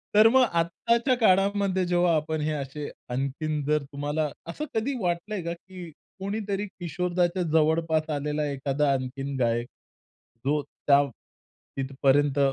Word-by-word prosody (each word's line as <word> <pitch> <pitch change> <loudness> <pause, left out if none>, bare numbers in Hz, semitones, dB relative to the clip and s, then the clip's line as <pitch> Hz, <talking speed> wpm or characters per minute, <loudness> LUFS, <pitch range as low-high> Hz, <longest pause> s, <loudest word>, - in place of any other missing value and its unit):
तर 215 +1 +8
मग 260 +2 +5
आत्ताच्या 230 +10 +1
काळामध्ये 195 -2 +3
जेव्हा 175 -1 +3
आपण 155 0 -1
हे 155 +1 0
असे 145 0 -4 0.2
आणखीन, 140 +4 -2
जर 150 -1 +1
तुम्हाला 145 +2 -2 0.2
असं 300 - -4
कधी 230 +5 0
वाटलंय 180 +3 -1
का, 170 - -3
की 180 -1 -10 0.3
कोणीतरी 200 0 -2
किशोरदाच्या 175 +2 0
जवळपास 160 0 +2
आलेला 150 +1 -1
एखादा 140 +1 0
आणखीन 135 +1 -3
गायक 120 0 +1 0.8
जो 150 +1 +2 0.3
त्या 140 0 +6 0.7
तिथपर्यंत 135 +1 +2
155 Hz, 125 wpm, -26 LUFS, 145-185 Hz, 0.8 s, तर